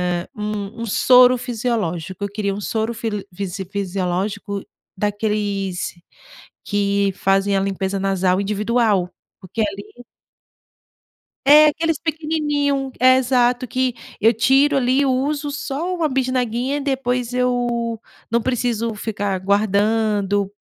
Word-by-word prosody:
hã, 175 - -4
um 210 +1 -4
um - - -2
soro 250 +3 +5
fisiológico. 210 -7 -3
Eu 200 - -2
queria 200 -1 -2
um 205 - -5
soro 220 +2 -2
fili 220 -3 -4
fisi 190 0 -5
fisiológico 195 +1 -3 0.4
daqueles 205 -2 -2 0.7
que 200 -1 +1
fazem 195 +1 +1
a - - +2
limpeza 195 0 -2
nasal 190 -1 +1
individual, 210 -2 +1 0.3
porque 200 +4 -5
ali 205 +4 -5 1.5
é 300 +1 +9
aqueles 325 +1 0
pequenininho 295 -4 -1
é, 255 +1 +6
exato 245 -1 +1
que 255 -1 0 0.3
eu 225 +2 +4
tiro 270 +5 +3
ali, 265 +2 +2
uso 285 +3 -1
só 295 +5 -3
1 335 -3 0
bisnaguinha 255 0 -1
e - - -4
depois 255 -3 -1
eu 240 -2 0 0.3
não 235 +1 +1
preciso 235 -2 -1
ficar 205 -3 -2
guardando, 205 0 +1
225 Hz, 120 wpm, -20 LUFS, 200-255 Hz, 1.5 s, é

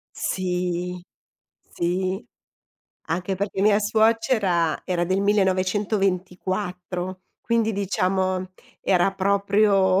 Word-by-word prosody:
Sì, 180 -1 -2 0.6
sì, 185 +3 -2 0.8
anche 180 +3 -1
perché 195 0 -3
mia 210 0 +4
suocera 215 - +2
era 175 -2 -1
del 185 +3 0
1924, 185 -2 -1 0.2
quindi 230 -1 +1
diciamo 185 -1 -1 0.3
era 185 0 +3
proprio, 200 -1 +3
190 Hz, 80 wpm, -24 LUFS, 180-200 Hz, 0.8 s, mia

